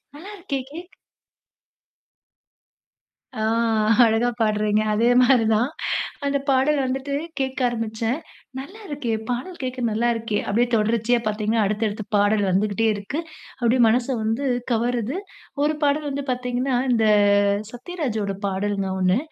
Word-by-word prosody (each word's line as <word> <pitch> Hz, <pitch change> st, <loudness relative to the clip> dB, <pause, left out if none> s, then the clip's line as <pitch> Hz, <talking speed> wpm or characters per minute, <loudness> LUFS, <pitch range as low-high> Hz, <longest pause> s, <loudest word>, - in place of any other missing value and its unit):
நல்லா 375 Hz, +8 st, -10 dB
இருக்கே 300 Hz, -7 st, -3 dB
கேக் 345 Hz, +4 st, -10 dB, 2.4 s
ஆ, 220 Hz, -, -5 dB, 0.6 s
அழகா 225 Hz, +2 st, +2 dB
பாடுறீங்க! 215 Hz, -1 st, +2 dB
அதே 230 Hz, +3 st, +3 dB
மாரிதான். 235 Hz, -1 st, +3 dB, 0.6 s
அந்த 280 Hz, 0 st, +1 dB
பாடல் 270 Hz, +3 st, +3 dB
வந்துட்டு 270 Hz, +2 st, -3 dB, 0.3 s
கேட்க 265 Hz, 0 st, -2 dB
ஆரம்பிச்சேன். 225 Hz, +2 st, -2 dB, 0.4 s
நல்லா 385 Hz, +11 st, -10 dB
இருக்கே! 285 Hz, -6 st, -3 dB, 0.2 s
பாடல் 260 Hz, +9 st, -4 dB
கேக்க 255 Hz, 0 st, -4 dB
நல்லா 225 Hz, +3 st, +1 dB
இருக்கே! 225 Hz, -2 st, -2 dB
அப்டியே 235 Hz, +4 st, +2 dB
தொடர்ச்சியா 225 Hz, +2 st, +2 dB
பாத்தீங்கன்னா, 215 Hz, +1 st, 0 dB
அடுத்தடுத்து 215 Hz, +1 st, -1 dB
பாடல் 205 Hz, 0 st, +3 dB
வந்துகிட்டே 210 Hz, +4 st, +1 dB
இருக்கு. 205 Hz, +9 st, -4 dB, 0.4 s
அப்டியே 240 Hz, +1 st, +3 dB
மனச 240 Hz, +2 st, +2 dB, 0.2 s
வந்து 225 Hz, +6 st, -1 dB, 0.3 s
கவருது. 240 Hz, -, 0 dB, 0.5 s
ஒரு 300 Hz, +1 st, +2 dB
பாடல் 290 Hz, +1 st, +1 dB
வந்து 280 Hz, +1 st, -3 dB
பாத்தீங்கன்னா, 250 Hz, +1 st, -1 dB, 0.2 s
இந்த 225 Hz, -2 st, +3 dB, 0.7 s
சத்யராஜோட 245 Hz, -, -3 dB
பாடலுங்க. 195 Hz, 0 st, -1 dB
ஒண்ணு, 185 Hz, +4 st, +3 dB
235 Hz, 120 wpm, -23 LUFS, 215-270 Hz, 2.4 s, அதே